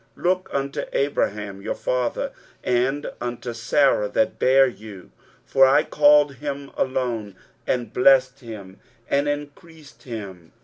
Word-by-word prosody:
23:051:002 - - -15
Look 185 +1 +1
unto 140 0 -2
Abraham 105 -8 -1
your - - -3
father, 125 -2 -2 0.3
and 130 +4 0
unto 120 0 -4
Sarah 115 -2 +2
that 185 0 0
bare 135 +1 +5
you: 105 -5 -9 0.3
for 135 0 +5
I 135 - +4
called 145 -2 +4
him 140 -1 -6
alone, 120 -6 -2 0.3
and 120 -3 -2
blessed 130 +1 +4
him, 105 -6 -10 0.3
and 140 +1 +2
increased 145 +1 -8
him. 100 -8 -9
130 Hz, 130 wpm, -23 LUFS, 110-140 Hz, 0.3 s, bare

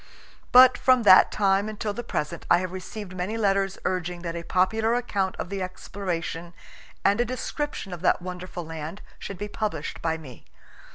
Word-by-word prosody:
But 255 0 +8
from 255 -2 +4
that 185 -3 +8
time 200 0 +2
until 210 -1 -3
the 240 - -5
present 165 -6 -4
I 175 - +7
have 185 0 -3
received 185 +1 -7
many 185 +5 -3
letters 195 -3 +1
urging 180 -1 -2
that 170 -1 -4
a 170 - -3
popular 220 +7 +1
account 200 -6 -1
of - - -5
the 195 -1 -3
exploration 175 -2 -4 0.5
and 200 +4 +4
a - - +4
description 255 -4 -4
of 175 - -7
that 185 - +3
wonderful 180 -1 -6
land 160 +4 -7 0.2
should 200 - -7
be 205 - -4
published 205 -7 -4
by 160 -1 0
me. 135 -7 -12
190 Hz, 175 wpm, -26 LUFS, 175-210 Hz, 0.5 s, But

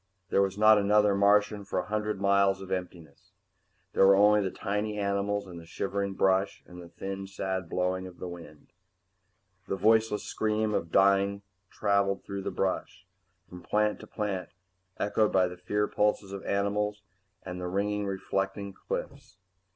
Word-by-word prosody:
There 100 - +3
was 95 0 0
not 110 0 +6
another 105 0 +4
Martian 105 +1 +3
for 100 - -4
a 90 - 0
hundred 105 0 -2
miles 100 0 +3
of 95 -1 -9
emptiness. 85 -5 -6 0.6
There 95 - +5
were 100 - +7
only 105 +1 +5
the 95 - -1
tiny 105 +3 -3
animals 100 0 -1
and 90 -3 -9
the 85 - -12
shivering 100 +2 -3
brush 95 +1 +1
and 90 0 -11
the 85 - -12
thin, 95 +3 -6
sad 95 -2 -4
blowing 95 +1 -1
of 90 - -13
the 90 - -6
wind. 85 -4 -11 0.9
The - - -1
voiceless 110 +2 +3
scream 110 0 -1
of 85 -4 -2
dying 100 +1 +3 0.3
traveled 100 -1 0
through 100 0 -5
the - - -3
brush, 95 -1 -3 0.4
from 90 0 -11
plant 105 +2 0
to - - -11
plant, 100 -4 -3 0.5
echoed 105 +1 +1
by 95 -1 +3
the 90 - -7
fear 105 +4 -1
pulses 105 -1 0
of 100 -1 -6
the - - -7
animals 105 +1 -1 0.4
and 90 -1 -6
the 90 - -3
ringingly 100 +2 -1
reflecting 95 +1 -3
cliffs. - - -6
100 Hz, 165 wpm, -29 LUFS, 95-105 Hz, 0.9 s, were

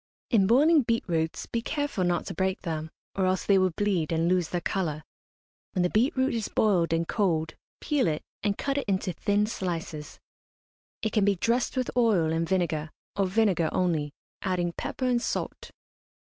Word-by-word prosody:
In 200 -6 +4
boiling 295 +7 +5
beet 230 -2 0
roots 160 -2 -1
be 230 - -2
careful 290 -7 -2
not 175 -1 0
to - - -5
break 190 +2 -1
them, 160 -3 -3 0.2
or 190 -1 +1
else 185 0 0
they 195 -1 +5
will 185 0 +3
bleed 180 -3 0
and 165 0 +1
lose 180 -2 +2
their 175 - -1
colour. 165 -4 -2 0.7
When 180 - +1
the 180 - +1
beet 245 +6 +2
root 260 +1 +2
is 225 -3 -1
boiled 180 -6 +2
and 165 0 +1
cold, 160 -7 0 0.3
peel 290 - +1
it, 155 -2 -1 0.2
and 205 -1 0
cut 280 0 -1
it 275 - -5
into 190 -2 0
thin 205 +5 +1
slices. 165 -7 -5 0.8
It 220 - 0
can 215 - +3
be 200 0 +3
dressed 235 +8 0
with 255 - 0
oil 205 -10 +3
and 165 0 -1
vinegar, 165 -5 0 0.3
or 195 -1 +1
vinegar 185 -5 +2
only, 160 -5 0 0.3
adding 175 -2 -1
pepper 260 - -4
and 245 -1 +2
salt. - - -3
190 Hz, 185 wpm, -27 LUFS, 165-225 Hz, 0.8 s, boiling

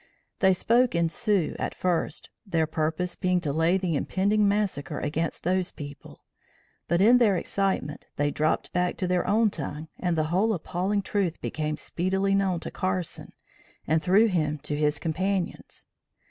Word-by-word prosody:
They 190 -3 +5
spoke 235 +4 +2
in 170 -1 +2
Sioux 195 -1 0
at - - -3
first, 175 -4 -1
their 165 -6 0
purpose 160 +3 -2
being 180 -1 +1
to 145 -5 -2
lay 165 +4 +3
the 180 -4 -1
impending 200 +7 +1
massacre 200 -8 -1
against 160 +2 -2
those 185 +1 0
people, 145 -1 -10 0.6
but 170 +2 +2
in 245 +4 +7
their 210 -6 +4
excitement, 190 -7 -2
they 145 0 +1
dropped 155 +5 0
back 180 -1 0
to 185 - -1
their 180 0 0
own 220 0 +3
tongue 155 0 -6
and 175 -2 0
the 155 - +2
whole 215 +4 +2
appalling 185 +4 -1
truth 190 -5 -1
became 155 -1 -3
speedily 190 +5 0
known 195 -3 +1
to - - -5
Carson 185 -2 -3 0.5
and 160 +1 +2
through 200 +6 +4
him 155 -5 0
to 150 0 -2
his 150 0 +1
companions. 180 +4 -3
180 Hz, 160 wpm, -26 LUFS, 160-195 Hz, 0.6 s, in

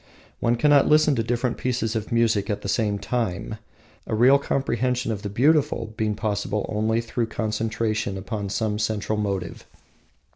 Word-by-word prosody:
One 120 +1 +2
cannot 145 +2 +4
listen 150 0 +5
to 120 - 0
different 120 +2 -1
pieces 120 -3 -1
of 110 -1 -3
music 115 -3 +2
at 105 0 -2
the - - -4
same 105 0 0
time, 110 -2 -3 0.5
a - - -1
real 130 +5 +6
comprehension 125 -3 -1
of 105 -2 -4
the 100 - -4
beautiful 135 -1 +2
being 110 -1 -1
possible 105 -1 -2
only 110 +2 0
through 115 0 -2
concentration 110 -2 -2
upon 100 +1 -4
some 105 +1 -1
central 110 0 -1
motive. 100 -2 -3
110 Hz, 155 wpm, -24 LUFS, 105-120 Hz, 0.5 s, real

